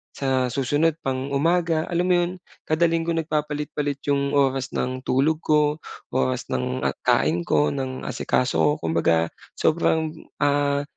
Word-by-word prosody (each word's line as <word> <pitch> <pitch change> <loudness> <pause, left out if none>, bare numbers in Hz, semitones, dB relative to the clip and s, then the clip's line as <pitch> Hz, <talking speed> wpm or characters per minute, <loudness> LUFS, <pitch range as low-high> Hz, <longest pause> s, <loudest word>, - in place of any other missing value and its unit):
sa 130 -2 +1
susunod 145 +5 +1
pang 135 +1 -2
umaga, 165 +2 +1
alam 175 +1 +1
mo 180 - +4
'yon? 175 - -2 0.4
Kada 160 +2 +3
linggo 165 0 0
nagpapalit-palit 150 -2 -2
'yong 140 0 +1
oras 135 -2 +1
ng 130 0 -2
tulog 150 +5 +1
ko, 150 -1 +3 0.4
oras 65 -1 0
ng 65 0 -1 0.3
kain 85 +2 +3
ko, 75 -2 +2
ng 130 -1 -4
asikaso 125 0 0
ko. 150 - +4
Kumbaga 80 0 +2 0.3
sobrang, 160 -1 +2 0.3
ah, 145 0 +2
145 Hz, 135 wpm, -23 LUFS, 130-155 Hz, 0.4 s, mo